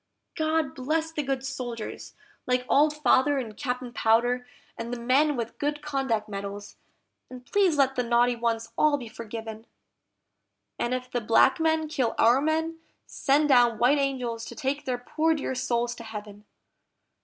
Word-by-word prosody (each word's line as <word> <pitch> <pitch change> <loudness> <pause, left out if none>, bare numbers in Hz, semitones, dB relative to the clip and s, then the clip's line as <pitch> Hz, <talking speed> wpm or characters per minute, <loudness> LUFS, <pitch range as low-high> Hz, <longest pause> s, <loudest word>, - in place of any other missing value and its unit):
GOD 315 -3 0
bless 315 +5 -1
the 310 - -2
good 270 -2 -2
soldiers, 245 -5 -6 0.3
like 250 0 +1
Old 300 +2 +4
Father, 290 -1 +3
and 225 -5 -4
Captain 250 -1 -4
Powder, 245 +2 +2 0.3
and 235 - -6
the 245 - -4
men 275 +5 +3
with 235 -2 -5
good 295 0 -2
conduct 265 -7 -1
medals; 200 0 -7 0.5
and 250 -1 -11
please 380 -4 +2
let 270 -1 +3
the 250 - +1
naughty 240 0 +2
ones 230 -1 -2
all 300 -1 +4
be 245 -4 -8
forgiven; 225 0 -8 1.1
And 240 +1 0
if 255 0 -6
the 245 - -1
black 230 +5 +4
men 320 -1 +1
kill 260 -6 -1
our 240 +4 +5
men, 320 +2 -1 0.3
send 295 +2 +1
down 240 -4 +5
white 255 +6 +3
angels 250 -5 -2
to - - -9
take 285 0 -2
their 255 -2 -1
poor 315 +6 0
dear 280 -3 -3
souls 240 -2 -1
to 235 - -10
Heaven! 210 -2 -9
255 Hz, 165 wpm, -26 LUFS, 235-290 Hz, 1.1 s, our